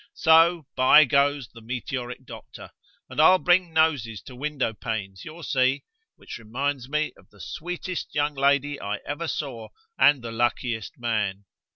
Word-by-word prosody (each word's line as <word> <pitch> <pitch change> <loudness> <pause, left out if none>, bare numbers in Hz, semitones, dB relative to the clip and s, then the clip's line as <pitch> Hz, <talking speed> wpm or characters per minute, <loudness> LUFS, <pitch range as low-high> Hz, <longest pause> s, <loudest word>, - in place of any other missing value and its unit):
So, 165 0 +4
by 130 +4 +7
goes 140 -2 +1
the 115 - -14
meteoric 125 +2 -5
doctor, - - -11 0.4
and - - -1
I'll 185 +4 +7
bring 180 -1 +2
noses 145 -10 +1
to 125 - -12
window 140 -3 -2
panes, 105 -4 -5
you'll 160 +2 -10
see, 135 0 +1 0.3
which - - -10
reminds 130 +3 -3
me 150 +1 -1
of - - -22
the - - -22
sweetest 180 +2 -6
young 145 0 +1
lady 140 +1 +1
I 100 +1 -3
ever 145 +4 -4
saw, 125 -8 -4 0.3
and 145 -4 +5
the 115 - -5
luckiest 115 -1 -2
man. 105 -4 -2
135 Hz, 155 wpm, -25 LUFS, 115-150 Hz, 0.4 s, by